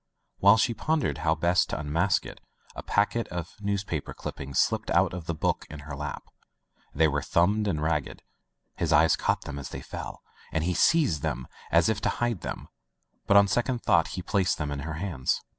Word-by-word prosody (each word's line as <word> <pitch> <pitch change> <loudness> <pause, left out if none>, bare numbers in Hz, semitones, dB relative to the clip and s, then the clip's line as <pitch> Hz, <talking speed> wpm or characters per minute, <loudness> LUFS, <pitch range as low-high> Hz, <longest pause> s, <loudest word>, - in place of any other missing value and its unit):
While 100 +3 +7
she 115 +1 +2
pondered 150 - -1
how 80 0 +2
best 85 +2 +2
to - - -3
unmask 80 +6 +1
it, - - -10 0.3
a - - -5
packet 105 +3 0
of 85 -1 -6
news 100 -1 -1
paper 80 -7 -4
clippings 70 0 -6
slipped - - +1
out - - +3
of 90 -2 -6
the 85 - -1
book - - -1
in 75 -1 -8
her 70 -1 -7
lap. 75 +1 -5 0.7
They 80 +2 +3
were 75 -1 0
thumbed 105 +8 +2
and 75 -6 -1
ragged. 75 -4 -2 0.5
His - - -1
eye 80 +2 +6
caught - - +1
them 70 -1 -6
as 70 -2 -7
they - - -7
fell, - - -7 0.3
and 80 0 0
he 90 +2 0
seized 145 - +3
them 65 - -3 0.2
as 85 0 +4
if 110 -1 0
to - - +1
hide 120 -6 -1
them, - - -6 0.6
but 100 - +6
on 100 0 +7
second 120 +3 0
thought 85 -5 +3 0.2
placed 95 -3 +1
them 75 -2 -3
in 70 - -3
her 80 +2 -5
hands. 80 -7 -1
85 Hz, 200 wpm, -27 LUFS, 75-100 Hz, 0.7 s, While